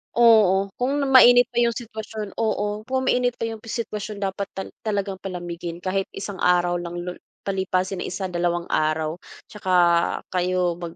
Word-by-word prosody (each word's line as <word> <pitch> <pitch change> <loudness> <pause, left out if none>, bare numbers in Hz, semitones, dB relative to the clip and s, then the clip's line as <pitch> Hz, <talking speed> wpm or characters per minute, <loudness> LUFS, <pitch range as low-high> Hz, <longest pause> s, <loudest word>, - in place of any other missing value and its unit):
Oo, 205 -5 +5
kung 280 +3 0
mainit 245 -1 +8
pa 240 - 0
'yung 235 -1 +2
sitwasyon 220 -3 -6
oo, 210 -1 -1
kung 260 0 0
mainit 245 -1 +1
pa - - -6
'yung 225 -1 -3
sitwasyon 215 -2 -5
dapat 195 0 -2
tal 190 - -5
talagang 200 -3 -2
palamigin 175 -2 -6
kahit 195 +1 -1
isang 195 0 -6
araw 175 0 +2
lang, 175 0 -6
lo 180 - -4 0.4
palipasin 190 -1 -1
ang - - -4
isa, 190 +1 -3
dalawang 175 -1 -1
araw, 155 +1 0 0.3
'tsaka 200 -3 -5 0.6
kayo 180 -1 +1
mag 170 -1 -7
195 Hz, 160 wpm, -23 LUFS, 180-220 Hz, 0.6 s, mainit